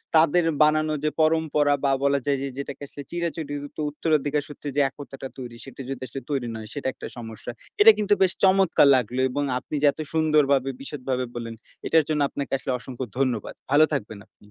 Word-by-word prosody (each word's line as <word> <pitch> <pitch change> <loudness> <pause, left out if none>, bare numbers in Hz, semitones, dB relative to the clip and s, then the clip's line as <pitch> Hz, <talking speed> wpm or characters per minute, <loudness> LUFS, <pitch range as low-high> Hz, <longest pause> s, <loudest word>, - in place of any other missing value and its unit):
তাদের 165 +2 +5 0.2
বানানো 155 0 +2
যে 155 - +2
পরম্পরা 155 -2 +3
বা 135 - +3
বলা 140 0 +3
যায় 140 -1 +1
যে 140 - -2
যেটাকে 140 0 -6
আসলে 145 - -9
চিরাচরিত 155 -4 -4
উত্তরাধিকার 150 -1 0
সূত্রে 145 0 -7
যে 145 - +4
একতাটা 135 -1 -9
তৈরি 120 -2 -7
সেটা 135 0 -10
যদি 135 -1 -5
আসলে 135 +3 -7
তৈরি 135 -4 -1
নয় 110 -1 -7
সেটা 145 -2 -4
একটা - - -8
সমস্যা। 115 0 -7 0.3
এটা 225 +1 +11
কিন্তু 205 -1 +2
বেশ 185 -2 +5
চমৎকার 190 -6 +5
লাগলো 125 0 -1
এবং 145 +3 -1 0.2
আপনি - - -7
যে - - +3
এত 155 - -21
সুন্দরভাবে 150 -4 +3
বিশদভাবে 130 -2 -3
বললেন 115 -1 -5 0.3
এটার 160 -1 +4
জন্য 150 -1 +1
আপনাকে 140 - -5
আসলে 130 - -4
অসংখ্য 130 0 -6
ধন্যবাদ 125 -6 -1 0.2
ভালো 155 +2 +7
থাকবেন 110 -6 -3
আপনি। - - -60
145 Hz, 185 wpm, -25 LUFS, 130-155 Hz, 0.3 s, এটা